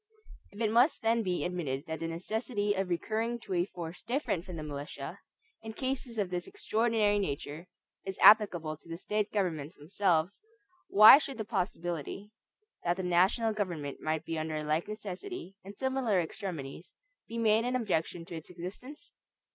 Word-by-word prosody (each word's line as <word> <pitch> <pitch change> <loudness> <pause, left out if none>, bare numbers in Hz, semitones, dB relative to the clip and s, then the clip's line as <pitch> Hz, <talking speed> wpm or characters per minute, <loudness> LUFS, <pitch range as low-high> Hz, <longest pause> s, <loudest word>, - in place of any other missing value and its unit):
If 200 - -13
it 220 -2 +1
must 240 +5 +4
then 230 +1 +3
be 180 -4 -1
admitted 155 -6 -3
that 160 -1 -4
the 165 - -3
necessity 205 +5 -1
of 195 -2 -2
recurring 220 +7 -1
to 195 - -5
a 175 0 +2
force 170 -2 -7
different 235 - -1
from 180 - -7
the 155 - -5
militia, 145 +1 -6 0.4
in 220 0 -7
cases 260 -1 -3
of 195 -4 -1
this 180 -1 -3
extraordinary 225 - +1
nature, 150 -1 -4 0.4
is 190 -1 -5
applicable 175 -8 +6
to 165 - -19
the 165 - -5
State 210 +3 -1
governments 165 -6 -2
themselves, 175 +2 0 0.5
why 215 +7 +10
should 275 -4 -5
the 220 - -3
possibility, 185 - -3 0.5
that 175 +1 +1
the 190 - -3
national 185 +6 +3
government 170 -9 -3
might 155 0 -1
be 165 -1 -2
under 155 0 -3
a 155 - -2
like 155 +2 0
necessity, 215 - -6
in 200 +2 -10
similar 260 -5 +1
extremities, 165 -3 -5 0.3
be 230 - -6
made 220 -1 +3
an 250 +1 -1
objection 175 -7 -1
to 170 - -8
its 160 - -8
existence? 190 - -9
190 Hz, 170 wpm, -31 LUFS, 165-220 Hz, 0.5 s, why